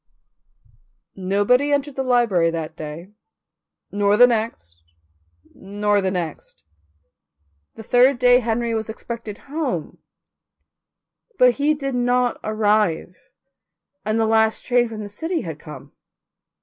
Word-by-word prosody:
Nobody 205 +9 +1
entered 285 -1 -1
the 270 - -2
library 235 -10 +2
that 165 -1 -5
day, 155 +5 -8 0.8
nor 205 0 +2
the 245 - +9
next, 215 - -3 0.7
nor 205 +1 -1
the 190 - 0
next. 175 -5 -6 1.1
The 220 - -10
third 250 +4 +4
day 245 0 +5
Henry 235 0 -1
was 220 -1 -3
expected 225 -2 -7
home, 275 - -4 1.4
but 250 0 +6
he 295 +2 +2
did 275 -2 -4
not 245 0 +1
arrive 210 -5 0 0.9
and 215 +1 -1
the 225 - +2
last 220 0 +1
train 245 -1 +2
from 220 -1 -7
the - - -6
city 325 - -3
had 160 -3 -7
come. 145 -2 -11
220 Hz, 120 wpm, -21 LUFS, 190-245 Hz, 1.4 s, the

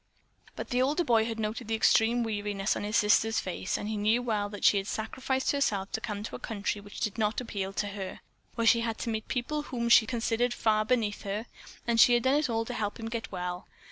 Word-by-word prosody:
But - - -7
the 250 +1 +2
older 290 +7 +2
boy 230 -6 +3
had 225 -1 -4
noted 220 +2 -3
the 225 - 0
extreme 225 +2 +3
weariness 205 -2 -1
on - - -4
his 210 +2 0
sister's 220 +1 +3
face. 185 0 -3
He 215 +1 +1
well 220 -4 -1
knew - - -15
that 205 - -8
she 205 - +6
had 195 0 -2
sacrificed 260 +4 -1
herself 205 -9 0
to 220 - -3
come 210 -2 -4
to - - -6
a - - -7
country 205 -1 -3
which 205 0 -10
did 215 +1 -2
not 215 0 +1
appeal 200 -6 -4
to 205 - -1
her; 195 -2 -6 0.3
where 230 -1 0
she 230 +1 +5
had 230 -1 -2
to 230 - -3
meet 220 -1 -3
people 285 +5 -2
whom 235 -5 -3
she 230 -1 +7
considered 240 0 0
far 215 -1 +2
beneath 220 -3 0
her, 205 +2 -3 0.4
and 235 -1 +1
she 240 +1 +7
had 240 - +1
done 260 - +3
it 300 - -1
all 225 -1 0
to 245 - -5
help 210 -2 -3
him 225 0 -5
get 230 -1 -5
well. 180 -1 -4
225 Hz, 235 wpm, -29 LUFS, 205-235 Hz, 0.4 s, she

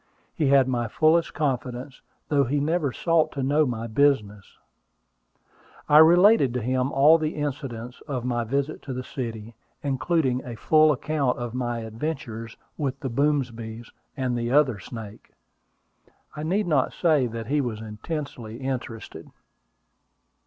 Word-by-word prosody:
He 150 - 0
had 135 -1 +5
my 120 -2 -1
fullest 160 +8 +2
confidence, 130 -2 -3 0.3
though 145 -2 +3
he 145 +4 0
never 155 -1 0
sought 165 +3 +1
to 140 - -3
know 145 +3 +3
my 115 -2 -3
business. 110 -5 0 1.3
I 150 - +7
related 170 - +6
to 125 - -1
him 130 +2 0
all 150 +4 +6
the 155 0 -2
incidents 130 -5 -5
of 130 -5 -3
my 120 -1 0
visit 140 +6 -2
to 135 - -6
the 125 0 -4
city, 115 -4 -6 0.3
including 135 -1 0
a 120 -2 -7
full 155 +6 +4
account 145 -2 -1
of 120 -1 -5
my 120 -2 -2
adventures 115 -1 -5 0.2
with 140 -3 -2
the 135 - -3
Boomsbys 120 -5 -1 0.3
and 130 -2 -1
the 120 0 -2
other 135 -6 +3
snake. 110 -1 -10 1.0
I 150 - -5
need 185 +7 0
not 150 -6 +1
say 155 -7 +2
that 115 0 -6
he 145 +5 +1
was 120 -5 -4
intensely 115 +1 -6
interested. 125 -4 -6
130 Hz, 145 wpm, -25 LUFS, 120-150 Hz, 1.3 s, I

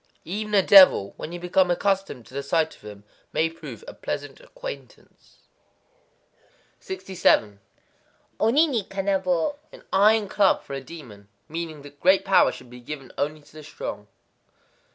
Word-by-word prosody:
_ - - -45 0.2
Even 210 +4 -3
a 195 - +5
devil, 185 - +7
when 160 - -7
you 175 - -6
become 180 +1 +2
accustomed 190 - -1
to - - -18
the 140 - -3
sight 160 +3 0
of - - -23
him, 105 -1 -11 0.3
may 160 +1 0
prove 165 - -10
a - - -8
pleasant - - -6
acquaintance. - - -11 1.4
67.—Oni 190 - -1
ni 250 -9 -1
kanabō. 190 - -1
An - - -14
iron 210 +2 +4
club 195 0 +2
for - - -9
a 135 - -4
demon. 125 -10 -12 0.2
Meaning 160 -2 -6
that 145 0 -14
great 190 +1 +4
power 195 - +4
should 125 - -13
be 125 - -11
given 135 +1 -8
only 150 +1 -2
to 145 - -21
the 155 0 -11
strong. 105 -8 -7
170 Hz, 155 wpm, -24 LUFS, 140-195 Hz, 1.4 s, devil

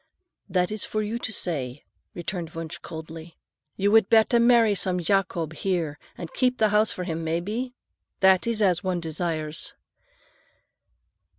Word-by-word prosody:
"That 180 +1 +1
is 215 -1 -1
for 215 0 -2
you 220 +3 -3
to 220 - -4
say," 145 - -3 0.3
returned 170 -2 -5
Wunsch 165 -1 -6
coldly. 160 0 -9 0.4
"You 200 +1 +1
would 220 -2 +5
better 225 +1 +5
marry 235 -2 +5
some 180 -1 0
Jacob 175 -3 0
here 165 -4 -2 0.2
and 170 -3 -7
keep 255 -1 +1
the 215 - +3
house 210 +1 +3
for 180 - -4
him, 165 -2 -3
may 160 +1 0
be? 235 +8 -4 0.4
That 190 +2 +5
is 225 -2 +1
as 180 -3 +2
one 185 -2 0
desires." 160 -1 -3
180 Hz, 155 wpm, -25 LUFS, 165-215 Hz, 0.4 s, would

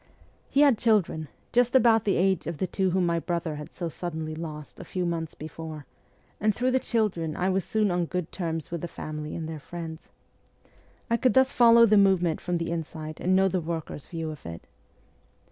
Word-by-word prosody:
He 280 - +3
had 280 -6 +5
children, 200 -9 +2 0.3
just 245 +1 +3
about 225 -3 +5
the 200 - +2
age 190 -1 +1
of 170 -2 -3
the 185 - 0
two 190 +1 0
whom 180 0 +1
my 170 -1 +1
brother 170 -3 -2
had 150 +2 -8
so 175 - -3
suddenly 160 -1 -4
lost 155 -2 -7
a - - -7
few 180 -1 -3
months 165 -2 -3
before, 155 -1 -8 0.5
and 215 -1 +2
through 255 +1 +1
the 260 - +3
children 190 -11 -1
I 185 +1 0
was 190 0 +1
soon 215 -3 +1
on 175 -1 +1
good 180 -1 -3
terms 165 -4 -4
with 170 -2 -3
the 175 - -3
family 155 -1 -6
and 160 -2 -4
their 160 -1 -6
friends. 160 +1 -8 1.0
I 230 - +2
could 255 +3 +2
thus 265 +1 +5
follow 235 -1 +7
the 215 -1 +5
movement 185 -5 +3
from 175 -1 -1
the 170 0 -3
inside, 155 -1 -5
and 185 +1 +2
know 190 0 +5
the 185 -1 0
workers' 160 -3 -5
view 165 -2 -4
of 150 - -10
it. 85 0 -8
175 Hz, 205 wpm, -27 LUFS, 160-200 Hz, 1.0 s, follow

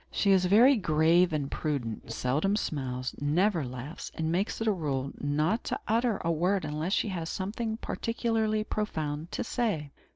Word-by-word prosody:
She 200 - +2
is 185 -1 +4
very 235 +8 +6
grave 170 0 +3
and 145 -3 -2
prudent, 120 -8 -3
seldom 150 - +1
smiles, 130 -9 -3
never 170 +4 +2
laughs, 130 +4 -7
and 160 0 -1
makes 190 +5 -1
it 225 - -1
a 220 - +4
rule 140 -7 -2
not 155 +10 0
to - - -2
utter 230 0 +2
a 170 - +2
word 180 +3 +1
unless 155 +5 -2
she 215 - +1
has 170 -4 -3
something 220 +3 -3
particularly 225 -2 -1
profound 160 -7 -3
to - - -2
say. 205 - -1
170 Hz, 165 wpm, -29 LUFS, 150-210 Hz, -, very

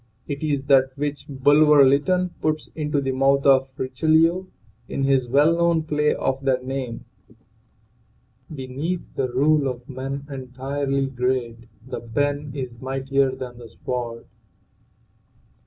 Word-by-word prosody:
It 140 -1 -4
is 145 -3 -1
that 135 -1 +3
which 145 0 -3
Bulwer 145 +1 +5
Lytton 180 +7 +2
puts 155 -1 -1
into 150 -2 -1
the 135 -1 -1
mouth 135 +1 +2
of 135 -1 +5
Richelieu, 160 +7 +2 0.4
in 135 - -2
his 135 -2 +2
well 145 +6 +4
known 170 -1 +2
play 150 -1 +1
of 135 0 -2
that 130 -2 0
name: 130 -3 -4 0.7
" 115 +5 -19
Beneath 140 +7 -4
the 130 - 0
rule 145 +3 +3
of 125 -1 -5
men 135 +1 -5
entirely 135 +1 -3
great 125 -3 -2 0.2
THE 130 - -5
PEN 145 +5 -2
is 125 -4 -6
MIGHTIER 135 0 0
THAN 125 -2 -8
THE 120 - -10
SWORD." 120 -2 -5
135 Hz, 135 wpm, -23 LUFS, 130-145 Hz, 0.7 s, Bulwer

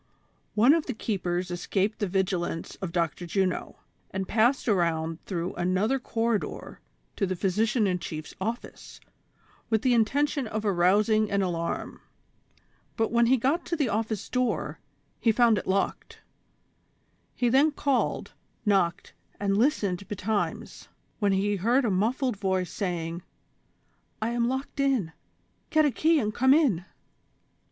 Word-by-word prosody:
One 235 +7 +6
of 330 -2 0
the 255 - -3
keepers 180 -4 -2
escaped 195 +4 -1
the 205 - 0
vigilance 180 -3 -2
of 190 -3 -5
Dr. 170 0 -1
Juno, 185 +1 -1 0.3
and 190 0 -4
passed 240 +5 +2
around 165 -5 0
through 175 -2 -3
another 190 +9 +1
corridor 230 -3 -2 0.4
to 195 - 0
the 185 - -2
physician 215 +5 +1
in 180 -2 0
chief 155 -3 -6
's - - -14
office, 225 +5 -5 0.7
wath 220 -1 +1
the 255 -2 +4
intention 275 +4 +1
of 215 0 -3
arous 195 +2 +3
ing 215 -1 +2
an 200 -1 +1
alarm; 170 -2 -3 1.0
but 225 -1 +1
when 235 0 +4
he 260 +2 +4
got 275 +8 +1
to 340 - -1
the 290 -7 0
office 215 0 -2
door, 250 -1 -1 0.4
he 230 - +3
found 230 -2 +4
it - - -9
locked; 195 +1 -2 1.1
he 245 - +1
then 270 +6 +5
called, 280 -3 -1 0.3
knocked 190 -5 +1 0.3
and 200 -1 +1
listened 200 - +1
betimes, 205 +1 -3 0.3
when 205 -2 +2
he 200 +1 +1
heard 240 +7 +2
a 220 - +1
muffled 230 +5 0
voice 190 -2 -1
saying: 170 -3 -3 0.5
" - - -42
I 220 - -1
am 235 0 0
locked 265 +2 -4
in; 265 -12 +1 0.6
get 310 -1 +4
a 290 - +3
key 320 +5 +3
and 215 -3 -1
come 260 +4 +5
in." 230 - +2
210 Hz, 145 wpm, -27 LUFS, 185-240 Hz, 1.1 s, One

